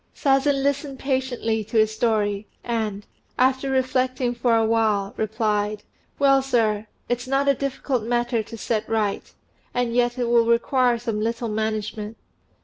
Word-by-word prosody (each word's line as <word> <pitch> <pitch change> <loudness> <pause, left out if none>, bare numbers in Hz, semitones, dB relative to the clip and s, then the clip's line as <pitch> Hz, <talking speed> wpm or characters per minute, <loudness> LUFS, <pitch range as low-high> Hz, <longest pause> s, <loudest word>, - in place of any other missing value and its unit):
Sazen 275 0 +2
listened 280 0 -1
patiently 255 -5 -1
to 225 +2 -3
his 220 0 +3
story, 210 -2 0 0.2
and, 220 -3 -2 0.3
after 260 +1 +2
reflecting 255 -1 0
for 235 -1 +2
a 225 0 +3
while, 215 -3 +1
replied, 215 -1 -1 0.3
"Well, 275 -1 +4
sir, 220 -5 +1 0.2
it's 245 +1 -2
not 270 +1 +1
a 280 - +6
difficult 270 -2 -2
matter 240 +1 0
to 230 +2 -9
set 220 0 -2
right: 215 -3 -1 0.4
and 245 -1 0
yet 240 0 +2
it 245 -1 0
will 235 -1 +4
require 240 +1 +3
some 225 -2 -3
little 230 +1 -2
management. 215 0 -3
235 Hz, 145 wpm, -23 LUFS, 220-260 Hz, 0.4 s, a